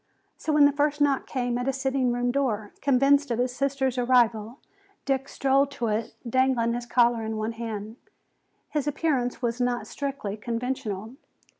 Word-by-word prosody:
So 315 - -3
when 300 -1 +6
the 285 - +5
first 295 +1 0
knock 285 -2 +2
came 245 -2 -1
at 245 - -3
his 270 0 -1
sitting 265 -2 +1
room 245 0 0
door, 225 -6 -1
convinced 280 +1 +3
of 235 - 0
his 250 0 -1
sister's 270 -2 0
arrival, 240 -2 +2 0.5
Dick 270 -1 -1
strode 275 +1 +2
to 235 -4 -2
it, 215 +1 -2
dangling 250 -1 +2
his 240 0 -4
collar 235 -1 +3
in 220 0 -3
his 220 +1 -3
hand. 220 -1 -5 0.7
His 295 -2 -1
appearance 275 -5 -1
was 240 +1 -1
not 245 0 0
strictly 275 -8 -4
conventional. 230 -1 -4
250 Hz, 165 wpm, -26 LUFS, 230-275 Hz, 0.7 s, when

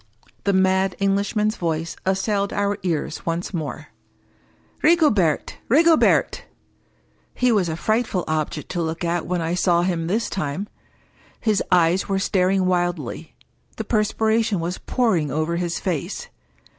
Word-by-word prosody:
The 200 - +3
mad 190 0 +2
Englishman's 205 +2 0
voice 165 -1 -2
assailed 200 +1 0
our 205 0 0
ears 170 -5 -2
once 170 +1 -2
again. 155 -4 -5 1.0
"Rigobert! 260 - +3
Rigobertl" 320 +5 +4 0.9
He 250 -1 +2
was 195 -6 +2
a 160 - -2
frightful 215 0 0
object 155 -1 -2
to 175 - -2
look 160 +1 -3
at 170 -1 -1
when 180 -1 -1
I 165 +1 -1
saw 175 -1 +2
him 170 -3 -1
this 220 +6 0
time. 180 +3 -3 0.7
His 215 -3 +1
eyes 180 +2 +3
were 195 - +1
staring 190 0 +1
wildly; 175 -5 -2 0.4
the 220 - -3
perspiration 220 -1 +1
was 175 +2 -3
pouring 200 - 0
over 155 +4 -1
his 175 -1 -2
face. 185 - -3
185 Hz, 130 wpm, -22 LUFS, 170-205 Hz, 1.0 s, Rigobertl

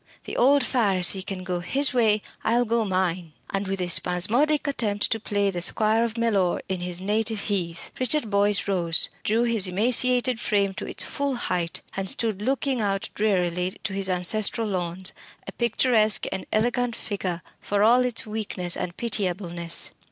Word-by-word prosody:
the - - -7
old 280 +2 +4
Pharisee 195 -7 +1
can 190 -1 -6
go 180 -1 -2
his 265 +12 0
way: 215 -4 +3 0.2
I'll 240 +2 +2
go 230 0 +1
mine." 185 -4 -1 0.2
And 195 0 -2
with 195 0 -2
a 180 - -1
spasmodic 225 - +3
attempt 215 -8 0
to 225 - +1
play 205 -2 0
the 175 -2 -4
squire 220 +5 +3
of 230 0 -3
Mellor 205 -6 +1
on 185 - -2
his 175 0 -4
native 215 +2 0
heath, 175 -5 -3
Richard 255 -2 0
Boyce 205 +1 +2
rose, 170 -4 +1
drew 225 +3 +2
his 230 -5 +1
emaciated 245 +5 +2
frame 200 -4 +1
to - - -6
its - - 0
full 280 -2 -2
height, 180 -8 -2
and 195 -1 -1
stood 220 -4 -1
looking 265 +1 0
out 195 -2 -1
drearily 180 -3 0
to 200 - -3
his 195 0 0
ancestral 205 +5 +2
lawns 185 -1 -3 0.3
a - - -6
picturesque 225 -2 +2
and 190 - -5
elegant 240 +2 0
figure, 185 -4 -4 0.2
for 205 0 0
all 245 +3 +5
its 250 -2 0
weakness 205 -5 -3
and 175 - -5
pitiableness. 180 -6 -2
205 Hz, 165 wpm, -25 LUFS, 185-230 Hz, 0.3 s, all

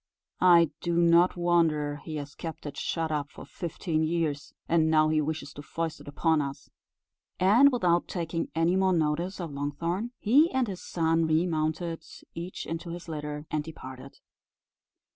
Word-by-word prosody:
I 170 -3 +6
do 170 -1 -1
not 170 +1 +4
wonder 160 -4 +2
he 160 - -5
has 145 -1 -6
kept 160 -2 -7
it 145 - -6
shut 165 -1 -2
up 145 -2 -2
for - - -11
fifteen 165 -2 -3
years, 155 -3 -1 0.2
and 160 -1 +3
now 155 -1 +4
he 155 0 +2
wishes 150 -2 -4
to 145 - -9
foist 165 +2 -4
it - - -15
upon 160 +2 +1
us." 140 0 -6 0.7
And 230 +10 +6
without 175 -8 +2
taking 165 -2 -3
any 165 +2 +2
more 190 0 +3
notice 170 +4 0
of 170 -4 -5
Longthorn, 165 +9 -2
he 280 +10 +4
and 260 -2 +1
his 190 -3 -6
son 165 -1 +1
remounted 160 0 0 0.3
each 175 +2 -6
into 165 +2 -5
his 175 +1 -7
litter, 150 -1 -5
and 155 -1 0
departed. 135 -4 -10
165 Hz, 160 wpm, -28 LUFS, 150-175 Hz, 0.7 s, I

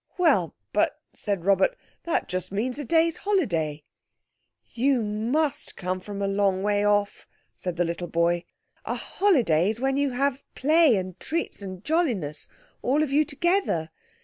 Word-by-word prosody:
"Well, 275 - +3 0.2
but," - - +1
said 195 -4 -3
Robert, 200 - +3 0.3
"that 340 - 0
just 185 0 -3
means 245 +7 -2
a - - -3
day's 325 +4 +2
holiday." 165 - 0 0.9
"You 255 0 +2
must 260 +9 -1
come 185 0 -2
from 200 +1 -6
a - - +1
long 195 -1 +1
way 205 0 +2
off," 205 0 +1 0.3
said 180 -2 -4
the 175 +1 +1
little 170 +1 -3
boy. 170 +1 +1 0.4
"A - - -2
holiday's 225 - +2
when 270 +1 +1
you 285 0 +2
all - - -5
have 275 0 +1
play 310 -2 +5
and 185 -2 -4
treats 330 -8 -3
and 185 -1 -7
jolliness, 225 - -1 0.3
all 285 +4 +2
of 290 - -3
you 295 +2 +4
together. 305 - 0
210 Hz, 155 wpm, -26 LUFS, 185-295 Hz, 0.9 s, play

